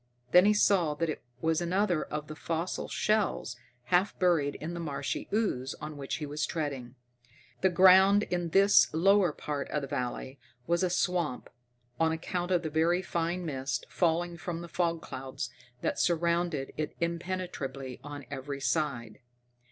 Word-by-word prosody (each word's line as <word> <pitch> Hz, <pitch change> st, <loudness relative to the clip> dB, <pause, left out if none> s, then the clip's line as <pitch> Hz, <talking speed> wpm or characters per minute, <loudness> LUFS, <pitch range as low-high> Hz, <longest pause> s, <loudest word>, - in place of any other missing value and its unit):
Then 180 Hz, +2 st, +7 dB
he 210 Hz, -, +5 dB
saw 180 Hz, -7 st, +3 dB
that 165 Hz, +2 st, -1 dB
it -, -, -7 dB, 0.2 s
was 160 Hz, +1 st, +1 dB
another 180 Hz, -1 st, +1 dB
of 150 Hz, 0 st, -4 dB
the 155 Hz, -, -8 dB
fossil 165 Hz, +2 st, -3 dB
shells, 210 Hz, -, 0 dB, 0.4 s
half 185 Hz, +4 st, +3 dB
buried 165 Hz, -6 st, +2 dB
in 160 Hz, +3 st, -5 dB
the 170 Hz, -, -5 dB
marshy 145 Hz, -4 st, -3 dB
ooze 195 Hz, -, 0 dB
on 150 Hz, 0 st, -7 dB
which 140 Hz, -1 st, -4 dB
he 150 Hz, -, -4 dB
was 150 Hz, +1 st, -2 dB
treading. 135 Hz, -6 st, -4 dB, 0.7 s
The 190 Hz, -, +4 dB
ground 190 Hz, +3 st, +6 dB
in 175 Hz, -3 st, -2 dB
this 200 Hz, +4 st, +5 dB
lower 195 Hz, +1 st, +4 dB
part 145 Hz, -1 st, -4 dB
of 150 Hz, -, -2 dB
the -, -, -4 dB
valley 130 Hz, +2 st, -4 dB, 0.3 s
was 170 Hz, +1 st, +1 dB
a 185 Hz, -, +2 dB
swamp, 175 Hz, -6 st, -1 dB, 0.5 s
on 160 Hz, 0 st, +3 dB
account 175 Hz, +2 st, -3 dB
of 180 Hz, -2 st, +2 dB
the 160 Hz, -, -3 dB
very 170 Hz, +4 st, +2 dB
fine 170 Hz, +1 st, -2 dB
mist 135 Hz, -4 st, -3 dB
falling 175 Hz, 0 st, 0 dB
from 170 Hz, -1 st, -4 dB
the 170 Hz, -, -7 dB
fog 170 Hz, -1 st, -1 dB
clouds 130 Hz, -1 st, -6 dB, 0.3 s
that -, -, -1 dB
surrounded 170 Hz, -4 st, +1 dB
it 155 Hz, -, -3 dB
impenetrably 170 Hz, -7 st, -4 dB
on 145 Hz, -1 st, -8 dB
every 140 Hz, 0 st, -5 dB
side. 125 Hz, -4 st, -1 dB
165 Hz, 160 wpm, -30 LUFS, 145-180 Hz, 0.7 s, Then